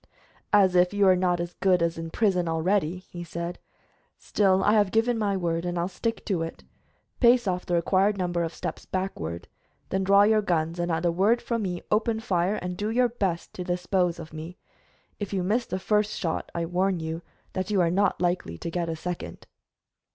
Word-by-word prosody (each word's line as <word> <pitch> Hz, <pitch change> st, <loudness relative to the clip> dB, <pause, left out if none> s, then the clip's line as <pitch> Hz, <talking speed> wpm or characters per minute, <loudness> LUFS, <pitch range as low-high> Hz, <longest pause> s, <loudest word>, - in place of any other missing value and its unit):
"As 195 Hz, -3 st, +5 dB
if 180 Hz, +2 st, +4 dB
you 200 Hz, -1 st, +4 dB
are 185 Hz, -, +6 dB
not 180 Hz, -1 st, +1 dB
as 175 Hz, 0 st, -4 dB
good 180 Hz, -3 st, +3 dB
as 165 Hz, 0 st, 0 dB
in 165 Hz, 0 st, -5 dB
prison 180 Hz, -2 st, +1 dB
already," 170 Hz, +1 st, +1 dB
he 175 Hz, -1 st, -6 dB
said. 170 Hz, +1 st, -5 dB, 0.6 s
"Still, 190 Hz, -2 st, +2 dB
I 210 Hz, -, +4 dB
have 205 Hz, -3 st, +4 dB
given 225 Hz, +4 st, +2 dB
my 205 Hz, -3 st, 0 dB
word, 170 Hz, -2 st, -1 dB
and 175 Hz, 0 st, -2 dB
I'll 170 Hz, +1 st, 0 dB
stick 225 Hz, +5 st, -3 dB
to 185 Hz, -5 st, 0 dB
it. 165 Hz, 0 st, -6 dB, 0.6 s
Pace 240 Hz, -1 st, +5 dB
off 180 Hz, -1 st, -2 dB
the 175 Hz, -, +1 dB
required 190 Hz, +4 st, +2 dB
number 175 Hz, -2 st, -1 dB
of 165 Hz, -1 st, -1 dB
steps 175 Hz, -1 st, -5 dB
backward, 85 Hz, -, -4 dB, 0.4 s
then 190 Hz, 0 st, 0 dB
draw 200 Hz, +1 st, +6 dB
your 215 Hz, +1 st, +4 dB
guns, 170 Hz, -3 st, -1 dB
and 175 Hz, 0 st, 0 dB
at 165 Hz, +1 st, -1 dB
the 175 Hz, -, +3 dB
word 200 Hz, +7 st, +3 dB
from 235 Hz, -1 st, -2 dB
me 180 Hz, -3 st, -3 dB
open 220 Hz, +1 st, +1 dB
fire, 190 Hz, -2 st, 0 dB
and 180 Hz, -3 st, -4 dB
do 210 Hz, +1 st, -2 dB
your 245 Hz, +2 st, +3 dB
best 195 Hz, -7 st, -2 dB
to 180 Hz, -, -5 dB
dispose 180 Hz, 0 st, 0 dB
of 160 Hz, -2 st, -10 dB
me. 160 Hz, +3 st, -8 dB, 0.6 s
If 205 Hz, -1 st, -4 dB
you 190 Hz, -2 st, 0 dB
miss 225 Hz, +6 st, 0 dB
the 185 Hz, -, -2 dB
first 210 Hz, +2 st, 0 dB
shot 165 Hz, -6 st, -3 dB
I 170 Hz, 0 st, -1 dB
warn 180 Hz, +1 st, 0 dB
you 160 Hz, +1 st, -4 dB, 0.3 s
that 185 Hz, +1 st, -2 dB
you 205 Hz, -2 st, +2 dB
are 170 Hz, -2 st, +3 dB
not 195 Hz, +1 st, +2 dB
likely 175 Hz, -, -1 dB
to 165 Hz, -, -5 dB
get 170 Hz, -1 st, -2 dB
a 165 Hz, -, -2 dB
second." 170 Hz, -, -6 dB
180 Hz, 210 wpm, -26 LUFS, 170-200 Hz, 0.6 s, are